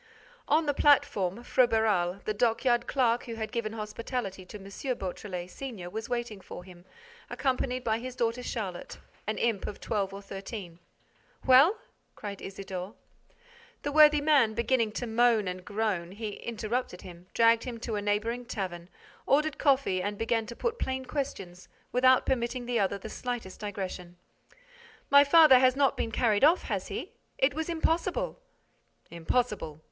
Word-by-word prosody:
On 315 +2 +3
the 290 - +1
platform, 235 -8 +2
Froberval, 220 -8 +2
the 215 - 0
dockyard 240 +2 +1
clerk 245 -3 +1
who 230 - -6
had 220 -1 -5
given 230 -3 -3
hospitality 215 -2 -5
to 210 - -8
M. 195 - -13 0.3
Beautrelet, 180 -1 -5
senior, 220 -10 -7
was 220 +3 -5
waiting 240 -5 -3
for 180 - -9
him, 180 -1 -15 0.4
accompanied 255 -2 -1
by 225 -1 0
his 255 +1 -7
daughter 235 0 -1
Charlotte, 195 -8 -5 0.3
an 215 - -1
imp 230 -4 0
of 205 - -7
twelve 200 -3 -2
or 200 +1 -9
thirteen. 195 -3 -8 0.7
"Well?" 275 +11 +6 0.4
cried 200 -1 -7
Isidore. 195 0 -6 0.9
The 290 - -2
worthy 300 0 +6
man 280 -8 +4
beginning 235 -1 +1
to 245 - -3
moan 230 -2 +3
and 180 0 -5
groan, 200 -3 -2
he 215 +1 -5
interrupted 220 -2 -4
him, 180 -1 -12
dragged 230 0 +4
him 240 -3 -5
to 230 - -4
a 205 - -2
neighboring 220 +4 -1
tavern, 180 -6 -5 0.4
ordered 300 +2 +2
coffee 265 -10 +2
and 205 +2 -3
began 225 0 0
to 235 - -7
put 475 - -2
plain 260 0 -2
questions, 195 -11 -5 0.2
without 255 +1 +4
permitting 245 -1 -1
the 240 -1 0
other 200 0 +1
the 200 - -8
slightest 240 -4 -5
digression: 190 -4 -6 0.9
"My 280 0 +9
father 290 -3 +7
has 255 0 +4
not 275 -1 +3
been - - -2
carried 215 -1 +2
off, 325 +5 +5
has - - -3
he? - - -5 0.3
It 270 +2 +3
was 320 +3 -3
impossible." 340 +10 -1 0.7
"Impossible. 170 -2 -1
225 Hz, 155 wpm, -29 LUFS, 195-255 Hz, 0.9 s, My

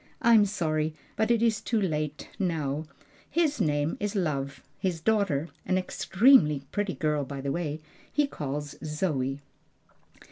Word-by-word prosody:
"I'm 225 -3 +6
sorry, 155 -5 -1 0.2
but 220 - +1
it 235 -1 +3
is 220 -3 +2
too 225 0 0
late 155 -6 -2
now 155 -5 -1 0.4
His 300 -5 +1
name 145 -2 +1
is 205 +1 -2
Love; 140 -7 -2 0.2
his 180 -3 -1
daughter 180 -6 +1
an 185 - +1
extremely 190 - +4
pretty 205 -5 -1
girl 150 0 0
by 140 +1 -6
the 135 0 -2
way 155 -1 -2 0.3
he 295 0 +3
calls 145 - -4
Zoe." 150 -4 -1
160 Hz, 140 wpm, -28 LUFS, 145-205 Hz, 0.4 s, I'm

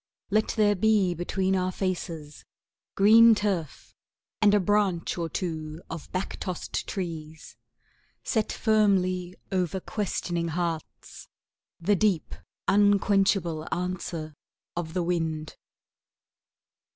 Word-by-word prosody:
Let 215 +1 +3
there 210 -1 +4
be 205 -2 +3
between 185 +3 -1
our 185 0 0
faces 170 -6 -4 0.5
Green 225 +3 +7
turf 190 - -3 0.5
and 210 -2 +6
a - - +5
branch 195 -3 +1
or 170 -2 -3
two 160 -1 -4
of 165 -2 -7
back 185 +1 -3
tossed 180 -2 -4
trees; 160 -4 -6 0.7
Set 220 -3 0
firmly 185 -5 +1 0.2
over 185 -1 0
questioning 175 -4 -2
hearts 165 -1 -4 0.5
The 195 +5 +2
deep 195 -4 +1 0.3
unquenchable 195 -5 +3
answer 175 -3 -3 0.4
of 170 -1 -4
the 180 - +1
wind. 160 -3 -2
180 Hz, 105 wpm, -27 LUFS, 165-200 Hz, 0.7 s, Green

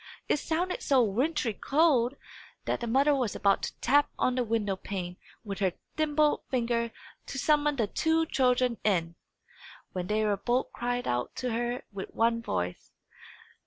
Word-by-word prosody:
It - - +2
sounded 345 +5 -1
so 265 -3 +4
wintry 240 +3 0
cold, 275 -1 +2 0.5
that - - -1
the 235 - -4
mother 275 +5 +4
was 255 -6 0
about 200 -1 +2
to - - -5
tap 285 +3 +4
on 255 - +2
the 250 0 +1
window 215 -4 0
pane 180 -2 -5 0.3
with 200 -2 -5
her 190 -3 +1 0.2
thimbled 305 -1 +2
finger, 235 -2 0 0.4
to 275 - -5
summon 295 +1 +2
the 235 -5 +1
two 320 +9 +1
children 250 -4 +2
in, 170 -5 +1 0.8
when 180 -1 -3
they 215 +2 +1 0.2
both 250 +2 0
cried 245 0 -2
out 120 0 -1
to 250 -1 -2
her 240 +2 -2
with 195 -2 -6
one 230 0 +2
voice. 90 - -4
240 Hz, 160 wpm, -29 LUFS, 210-280 Hz, 0.8 s, so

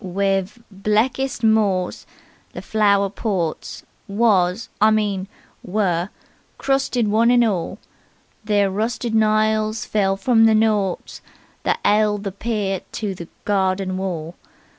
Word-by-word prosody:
"Wiv' 195 +2 -1
blekest 225 +6 -1
morss 205 -5 +1 0.5
the - - -7
flower 200 -2 +2
ports 190 -5 -3 0.2
Was 200 -2 +1
I 215 - +6
mean 205 -3 0 0.3
were 180 -2 -1 0.5
crusted 270 -4 0
one 225 +3 +3
and 240 -1 +5
orl; 185 -7 -2 0.7
Ther 205 -2 +2
rusted 225 +3 -2
niles 215 0 +1
fell 195 -2 0
from 225 +2 +4
the 220 - +4
knorts 210 -4 0 0.4
That - - 0
'eld 210 -1 +2
the 195 - -3
pear 200 -2 -2
to 210 -3 -3
the 170 -2 -9 0.2
garden 190 -2 0
worll. 175 -4 -4
205 Hz, 120 wpm, -21 LUFS, 190-220 Hz, 0.7 s, I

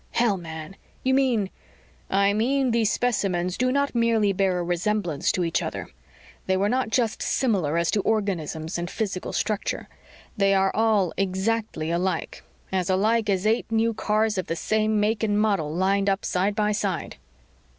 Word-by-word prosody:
"Hell, 235 -4 +2
man! 160 0 -8 0.3
You 260 - +2
mean 245 -8 +2 0.3
" - - -31 0.2
"I 200 +1 +3
mean 255 +4 +1
these 225 -2 +2
specimens 185 -7 0
do 255 0 +1
not 280 +1 +1
merely 230 -4 +2
bear 190 -1 +1
a 175 - -1
resemblance 175 -2 0
to 180 - 0
each 165 -1 0
other. - - -5 0.6
They 190 0 +2
were 200 +2 +1
not 255 -1 0
just 230 -1 0
similar 185 - +1
as 170 0 +1
to 205 - +1
organisms 175 -7 -1
and 175 0 -3
physical 195 -4 -3
structure. 215 -1 -2 0.5
They 195 -1 +3
were 195 0 +1
all 215 -5 +2
exactly 195 -3 -1
alike; 180 +2 -2 0.3
as 185 -2 -1
alike 210 +3 +2
as 195 0 +1
eight 225 +1 +1
new 225 +1 +2
cars 215 -1 0
of 185 - -4
the 165 - -2
same 215 +4 +1
make 210 +1 +1
and 210 -2 +1
model 200 -8 +1
lined 195 +4 +1
up 195 +1 -1
side 195 +3 0
by 210 -1 +1
side 200 -4 -2
200 Hz, 170 wpm, -25 LUFS, 185-220 Hz, 0.6 s, I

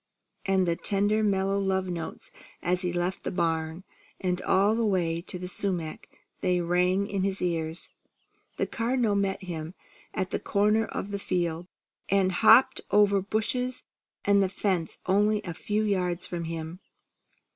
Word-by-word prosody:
and 190 -1 +3
the 170 - +2
tender 205 +3 +1
mellow 195 -1 +1
love 190 -1 0
notes 170 -3 -6 0.3
as 180 +1 +1
he 180 -2 -1
left 175 +2 -2
the - - -2
barn; 165 0 -1 0.4
and 180 -1 -1
all 200 +3 +3
the 230 - 0
way 175 -5 +1
to 180 +1 -5
the 180 0 -6
sumac 180 -4 -2 0.3
they 180 -2 +1
rang 180 +3 +2
in 200 -2 -2
his 195 0 -1
ears. 165 -1 -2 0.7
The - - +1
Cardinal 235 -2 0
met 195 -1 0
him 165 -1 -6 0.4
at 190 -3 -2
the - - -1
corner 210 +2 +2
of 200 - -5
the 200 - -2
field, 175 -3 -2 0.4
and 195 -1 +3
hopped 245 +7 +6
over 200 -1 +4
bushes 245 +5 -2 0.4
and 200 0 +5
the 190 - +2
fence 185 -4 -1
only 210 +3 +3
a 170 - -5
few 210 +5 -1
yards 180 -4 0
from 170 -1 -4
him. 165 +1 -5
190 Hz, 155 wpm, -27 LUFS, 175-200 Hz, 0.7 s, hopped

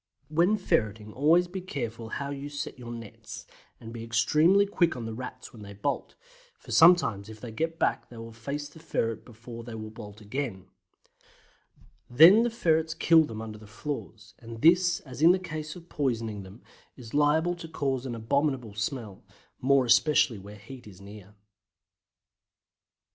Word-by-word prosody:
When 175 +7 +3
ferreting 110 - -1
always 165 +6 +3
be 190 +1 -6
careful 120 -9 -5
how 140 +3 -4
you 140 +1 -6
set 145 -2 -6
your 120 -1 -8
nets, 115 -3 -9 0.3
and 115 0 -10
be 115 -1 -7
extremely 150 - +3
quick 175 -4 +1
on 120 -2 -6
the 115 - -5
Rats 125 +2 -8
when 110 - -12
they 100 0 -9
bolt, 105 +8 -3 0.4
for - - -13
sometimes 160 - +5
if 110 0 -10
they 120 0 -8
get 165 +8 -3
back - - -1
they 120 - -12
will 115 0 -8
face 140 +6 -5
the 155 +2 -15
ferret 115 -8 -2
before 115 0 -11
they 115 -1 -8
will 110 -1 -7
bolt 105 -2 -11
again; 105 -3 -5 1.4
then 165 - +8
the 240 - +1
ferrets 160 -7 0
kill 165 -1 +5
them 110 -4 -7
under 110 -1 -8
the 105 - -14
floors, 110 -2 -7
and 115 -1 -10
this 175 +1 +4
as 130 0 -10
in 170 +3 +7
the - - +2
case 155 -4 -6
of 175 -1 -13
poisoning 115 -9 -2
them 95 +5 -13 0.3
is 120 -4 -11
liable 150 +4 +3
to 175 -1 -9
cause 135 -5 -2
an 120 - -4
abominable 130 -1 -1
smell, 110 -2 -5 0.4
more 135 0 +3
especially 125 -3 +3
where 100 +2 -11
heat 120 +3 -12
is 95 -3 -13
near. 100 0 -13
125 Hz, 170 wpm, -28 LUFS, 110-155 Hz, 1.4 s, then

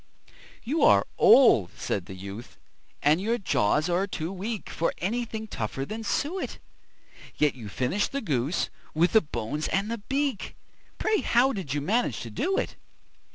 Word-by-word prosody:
"You 295 +7 -1
are - - +6
old," 115 - +7
said 95 -3 -3
the 95 - -8
youth, 100 +5 -9 0.5
"and 150 +5 +4
your 230 +4 0
jaws 150 - +1
are 180 +3 +1
too 175 -1 -4
weak 210 +3 -4
For 165 - 0
anything 220 +3 -3
tougher 135 - -4
than 220 +7 -6
suet; 325 - -2 0.8
Yet 150 -1 +2
you 115 -5 -9
finished 130 - -1
the 275 - -1
goose, 145 - -1 0.2
with 170 +3 +3
the 220 - +7
bones 150 - -3
and 200 +3 -1
the 230 - -3
beak 270 -1 -2 0.4
Pray, 435 -1 +1
how 255 +3 +3
did 165 - -4
you 145 - -1
manage 195 - 0
to 115 - -7
do 380 - 0
it?" - - -2
185 Hz, 160 wpm, -27 LUFS, -, 0.8 s, old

